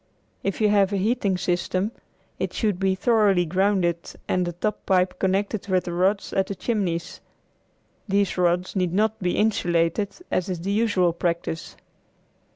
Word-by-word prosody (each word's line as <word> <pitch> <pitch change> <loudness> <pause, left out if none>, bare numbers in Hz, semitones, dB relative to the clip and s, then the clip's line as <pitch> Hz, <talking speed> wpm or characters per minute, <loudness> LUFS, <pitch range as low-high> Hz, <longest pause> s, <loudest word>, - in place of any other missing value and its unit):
If 195 +2 -2
you 210 - +4
have 200 -1 +3
a 200 - 0
heating 200 -1 +1
system 185 +3 -1 0.5
it - - -2
should 210 -5 0
be 190 -1 +2
thoroughly 200 -4 +3
grounded 185 -1 +1 0.3
and 180 -1 +1
the 175 - -3
top 210 +5 -3
pipe 185 -1 +2
connected 200 +2 0
with 185 -2 +2
the 175 - -5
rods 190 +3 +1
at 190 -1 +1
the 200 - -4
chimneys. 190 -7 -2 0.9
These 200 -1 +1
rods 180 +1 +1
need 180 -3 0
not 215 +2 +1
be 180 -2 -1
insulated 175 -2 +1 0.2
as 185 - 0
is 180 -3 -3
the 195 +3 -2
usual 200 -5 +2
practice. 170 -1 -3
190 Hz, 160 wpm, -24 LUFS, 175-205 Hz, 0.9 s, you